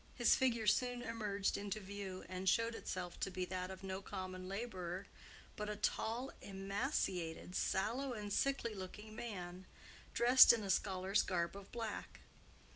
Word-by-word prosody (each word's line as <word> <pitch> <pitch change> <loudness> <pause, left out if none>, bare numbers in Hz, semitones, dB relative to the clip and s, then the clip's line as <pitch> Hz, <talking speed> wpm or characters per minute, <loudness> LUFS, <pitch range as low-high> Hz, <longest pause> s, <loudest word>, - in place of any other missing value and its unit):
His 240 -2 +5
figure 235 -4 +2
soon 245 +3 +2
emerged 210 -4 -1
into 205 +1 -3
view, 195 -2 -6
and 185 +1 0
showed 230 +3 +3
itself 180 -5 -4
to - - 0
be 185 -1 -2
that 185 0 -3
of 190 0 -8
no 190 0 -3
common 185 -1 -5
laborer, 190 -3 -4 0.5
but 210 0 -3
a 210 - -2
tall, 230 +5 -1
emaciated, 195 - -2
sallow, 235 +11 0
and 205 -3 -4
sickly 270 -4 +1
looking 210 +3 -8
man, 185 -5 -6 0.5
dressed 245 +1 +9
in 225 -2 -1
a 195 - +1
scholar's 190 +1 +2
garb 170 -1 -1
of 200 -1 -10
black. 225 -3 -5
200 Hz, 150 wpm, -38 LUFS, 185-230 Hz, 0.5 s, dressed